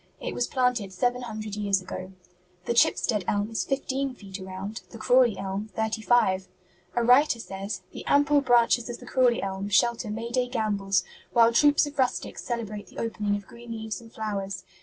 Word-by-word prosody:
It - - -4
was 245 - 0
planted 250 -6 0
seven 245 +6 0
hundred 215 -3 -5
years 200 -2 +1
ago. 185 0 -7 0.5
The - - 0
Chipstead 220 -3 +3
Elm 205 +2 0
is 225 - -1
fifteen 270 -1 -2
feet 200 -3 -9
around; 190 +2 -6
the 230 - -10
Crawley 245 -2 +4
Elm, 195 +2 -4
thirty 220 0 -1
five. 190 -5 +3 0.5
A 240 - +2
writer 250 +2 +5
says, 195 -2 -5
'The - - -8
ample 285 0 +4
branches 240 -2 +3
of 240 - -4
the 245 - -13
Crawley 245 -2 +2
Elm 195 +1 -3
shelter 230 +3 +2
Mayday 235 +3 -1
gambols 200 -6 0 0.3
while 235 -1 +5
troops 290 +4 +5
of 290 -1 -9
rustics 255 -1 -1
celebrate 215 -4 -4
the - - -16
opening 210 -3 -1
of 205 -1 -6
green 235 +1 -10
leaves 220 -1 -5
and 225 -1 -14
flowers. 200 -4 -4
225 Hz, 180 wpm, -27 LUFS, 200-245 Hz, 0.5 s, writer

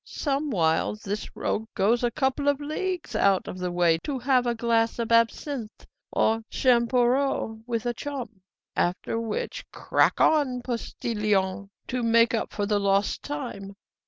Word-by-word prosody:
"Somewhiles 215 - 0
this 205 +1 -5
rogue 220 +1 -2
goes 230 +5 +2
a 240 - +3
couple 265 +4 -1
of 285 -1 +3
leagues 335 +4 -3
out 195 -1 +3
of 185 - -6
the 180 -1 -2
way 170 -2 +3
to 275 - -4
have 250 -1 +2
a 240 - +1
glass 230 0 +1
of 235 -1 -3
absinthe 230 +1 0 0.3
or 225 +1 +2
champoreau 245 -1 +2
with 230 -2 -2
a 240 - 0
chum. 245 -6 -6 0.3
After 180 +5 -1
which, 225 -2 -4
'Crack - - +1
on, 265 -6 +3
postillion!' 210 -5 -1 0.2
to 250 0 -2
make 230 0 +4
up 225 - -1
for 205 - -2
the 205 0 +1
lost 200 0 +1
time. 235 -9 -6
230 Hz, 150 wpm, -26 LUFS, 205-260 Hz, 0.3 s, make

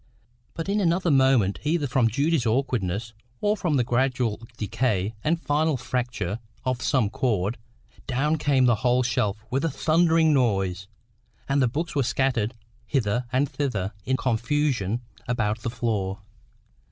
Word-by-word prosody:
But 165 +1 -4
in 200 +2 +1
another 175 -1 +2
moment, 130 -8 +3
either 150 0 +1
from 125 -3 +2
Judy's 140 +3 +1
awkwardness, 110 -4 -1 0.3
or 210 +1 +2
from 175 -7 0
the 125 - +3
gradual 125 -2 0 0.2
decay 105 -1 -1
and 165 +2 +1
final 150 -1 +1
fracture 120 -5 -3 0.3
of 130 -1 -1
some 130 -6 +2
cord, 110 -1 -1 0.5
down 145 +5 +1
came 140 -3 +3
the 120 -3 +4
whole 125 +3 +2
shelf 110 -3 -1
with 135 +4 0
a 165 - +2
thundering 160 +1 +3
noise, 95 -8 +1 0.6
and 140 0 +2
the 130 - +4
books 155 +8 -3
were 140 - +1
scattered 125 -2 0 0.3
hither 120 -2 0
and 130 +3 +2
thither 110 -9 -2
in 130 +4 0
confusion 120 -3 0 0.3
about 110 -2 0
the 115 - -3
floor. 105 -5 -2
125 Hz, 145 wpm, -25 LUFS, 110-145 Hz, 0.6 s, the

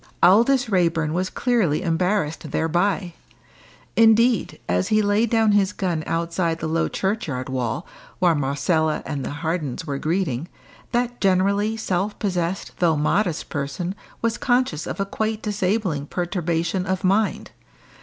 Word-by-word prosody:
Aldous 235 +8 +5
Raeburn 165 -6 +1
was 185 +2 -1
clearly 225 - +1
embarrassed 165 -2 0
thereby. 175 +4 0 0.8
Indeed, 225 0 +4
as 90 +1 +1
he 215 0 +3
laid 205 +3 +2
down 225 -2 +3
his 205 -1 +2
gun 175 -5 -2
outside 165 0 -1
the 160 - -4
low 165 +1 +1
churchyard 165 - -2
wall, 130 - -2 0.3
while 175 -2 +4
Marcella 155 +2 0
and 140 -2 -3
the - - -3 0.2
Hardens 160 -4 -2
were 140 -3 -3
greeting, 160 -4 -1 0.4
that 245 0 -1
generally 200 +3 +2
self 195 -1 -1
possessed 180 -2 -2
though 165 -3 +3
modest 170 +3 0
person 145 +6 -3 0.3
was 230 0 0
conscious 245 - +1
of - - -5
a 195 - +1
quite 220 +2 -2
disabling 195 -7 -1
perturbation 175 +1 -1
of 185 0 -1
mind. 200 +3 +1
180 Hz, 135 wpm, -23 LUFS, 160-210 Hz, 0.8 s, Aldous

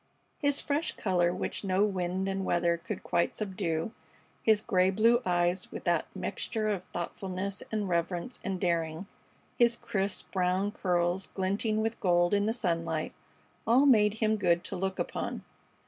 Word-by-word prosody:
His 285 -1 +2
fresh 295 +3 -1
color, 175 -3 +1
which 185 - -3
no 190 0 +2
wind 190 -2 -1
and 195 0 -1
weather 170 -2 +2
could 195 +4 -6
quite 170 0 0
subdue, 185 -3 -2 0.5
his 220 -2 +4
gray 185 -3 +2
blue 230 +5 +4
eyes 175 +1 +1
with - - -7
that - - +1
mixture 215 -2 -2
of 190 -3 -2
thoughtfulness 190 +3 -4
and 215 -2 -1
reverence 175 +6 -2
and 190 -2 -2
daring, 170 -1 -1 0.5
his 240 -1 +5
crisp, 205 -4 -2
brown 185 +2 +1
curls 180 -2 0
glinting 205 +3 0
with 225 +1 -2
gold 175 0 +3
in 205 +1 +2
the - - +2
sunlight 165 -7 -1 0.5
all 250 +5 +5
made 215 -6 +5
him 220 -1 +1
good 170 -4 +2
to - - -5
look 190 +1 -2
upon. - - -3
190 Hz, 155 wpm, -30 LUFS, 175-215 Hz, 0.5 s, his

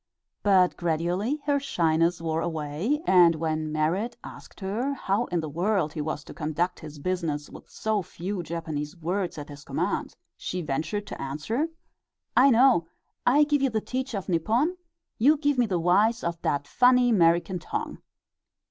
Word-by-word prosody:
But 190 -3 +4
gradually 175 - -1
her 285 -1 +2
shyness 165 - +1
wore 160 0 -1
away, 165 - -2
and 175 - +6
when 155 -1 -2
Merrit 180 +10 -1
asked - - -12
her 230 +9 -2
how 210 -1 0
in 175 -2 -1
the 155 - -4
world 170 0 0
he 155 - -3
was 150 -1 -3
to - - -11
conduct 165 +3 -2
his 155 -2 -10
business 155 -2 -2
with - - -13
so 220 -2 -1
few 185 +2 -5
Japanese 160 -1 -5
words 175 +2 -2
at 145 0 -7
his 145 0 -10
command, - - -2 0.2
she 180 -1 -4
ventured 160 +8 -2
to - - -8
answer: 155 - -2 0.7
"I 270 +3 +7
know; 240 -8 +5 0.4
I 285 +5 +6
give 290 -1 +1
you 270 - +3
the 220 -2 0
teach 255 +2 -4
of 195 - -4
Nippon, 225 - +1 0.4
you 290 +7 +5
give 290 -3 +1
me 240 - +3
the 185 -4 0
wise 205 +7 +3
of 170 -1 -3
dat 145 0 0
funny 250 - +4
'Merican 175 0 +3
tongue." - - -4
180 Hz, 165 wpm, -26 LUFS, 160-230 Hz, 0.7 s, I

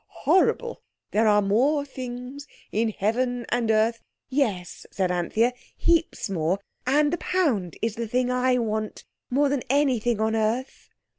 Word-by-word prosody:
Horrible! 475 +5 +2 0.3
There 220 +1 +3
are 210 -1 +4
more 270 +9 +2
things 255 +1 -7 0.2
in 225 +2 +1
heaven 240 +4 -1
and 240 -2 0
earth—" 220 +1 +2 0.3
"Yes," 215 - -2
said 185 -2 -1
Anthea, 215 +8 +1 0.2
"heaps 335 -6 +1
more. 175 -1 0 0.3
And 295 +3 +3
the 345 - -1
pound 255 - 0
is 225 -1 +1
the 230 -1 -3
thing 250 +2 0
I 250 0 +2
want 215 -2 -2 0.3
more 285 +3 +3
than 275 -2 0
anything 250 -5 +2
on 220 +1 +1
earth." 225 +4 -2
240 Hz, 145 wpm, -25 LUFS, 215-270 Hz, 0.3 s, are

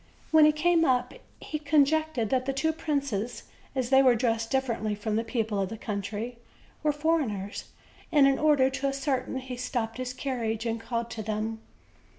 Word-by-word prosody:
When 315 -1 +7
he 305 - +6
came 330 +2 +3
up 250 -4 +1 0.3
he 305 - -5
con 295 -1 +4
jectured 310 -6 -1
that 255 0 +1
the 270 - 0
two 315 +4 0
princes, 275 -8 -2 0.3
as 260 -1 -1
they 265 0 +7
were 255 -2 +5
dressed 225 -1 0
dif 265 0 +1
ferently 220 -4 -2
from 210 +1 -2
the 225 - +1
people 220 -3 -1
of 190 - -1
the 225 - -6
country, 210 +3 -4 0.4
were 305 - +2
foreigners; 285 -10 -1 0.5
and, 290 -4 +6
in 270 -1 +2
order 290 -4 +4
to 275 +1 -1
ascertain, 275 -2 -1
he 260 -1 -5
stopped 240 -2 -3
his 255 0 -3
carriage 235 -4 -2
and 230 0 -2
called 235 0 -3
to 220 - -5
them. 220 +1 -3
255 Hz, 185 wpm, -28 LUFS, 225-280 Hz, 0.5 s, When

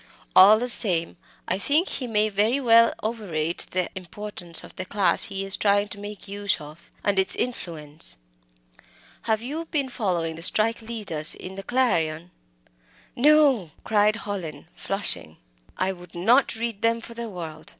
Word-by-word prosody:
All 200 +3 +8
the 245 +3 -2
same 180 -8 +6 0.3
I 190 - -1
think 305 - +1
he 255 - -4
may 215 -2 +1
very 215 +6 +1
well 230 -3 +5
overrate 175 -8 -3
the 185 -1 -1
importance 185 -2 -5
of - - -14
the 185 - -5
class 195 +1 +1
he 195 -1 -4
is 195 - +4
trying 205 0 +1
to 205 - -7
make 205 0 -9
use 200 0 -2
of, 150 +2 -13
and 200 -1 +1
its 190 0 +1
influence. 155 - -6 1.1
Have 220 0 +1
you 305 +6 -5
been 285 -5 -2
following 175 -9 -2
the - - -9
strike 220 +6 +2
'leaders' 200 -9 -2
in 185 - -9
the 195 - -7
Clarion?" 175 -9 -1 0.8
"No!" 280 - +4
cried 210 0 +2
Hallin, 175 -9 -6
flushing. 85 - -3 0.4
"I 185 +1 0
would 180 -1 -13
not 235 +10 +3
read 225 -2 -4
them 230 0 +1
for 230 0 -10
the 235 0 -6
world! 165 -5 -8
205 Hz, 160 wpm, -24 LUFS, 175-230 Hz, 1.1 s, All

